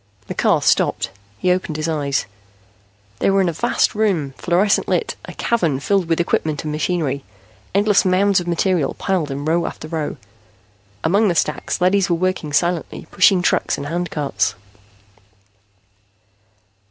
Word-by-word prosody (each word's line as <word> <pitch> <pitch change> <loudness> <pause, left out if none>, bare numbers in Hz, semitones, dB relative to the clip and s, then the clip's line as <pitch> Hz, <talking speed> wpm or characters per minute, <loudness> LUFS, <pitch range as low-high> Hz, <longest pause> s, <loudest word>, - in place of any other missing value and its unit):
The - - -5
car - - +2
stopped. 95 - +1 0.3
He 180 - +1
opened 180 -4 -1
his 155 +1 -2
eyes. 145 -4 -1 0.9
They - - +2
were 195 0 +3
in 190 - +2
a - - -3
vast - - +1
room, 195 -10 0
fluorescent 185 +4 +1
lit, 455 - 0
a - - -9
cavern 170 - 0
filled 185 +3 0
with 165 - +1
equipment 155 -3 0
and 155 - -3
machinery, 150 -3 -1 0.5
endless 205 0 +4
mounds 195 +1 +3
of 175 - -6
material 175 -2 0
piled 185 -6 -1
in 140 +1 -4
row 165 +2 +1
after - - -7
row. 155 -2 -3 0.9
Among 200 +7 +3
the 175 - +1
stacks, 145 - -1
leadys 185 0 +3
were 170 - +3
working 185 -3 -1
silently, 170 +3 -1
pushing 185 -3 +4
trucks - - +1
and 140 - -5
handcarts. 160 -3 -1
170 Hz, 150 wpm, -20 LUFS, 155-190 Hz, 0.9 s, endless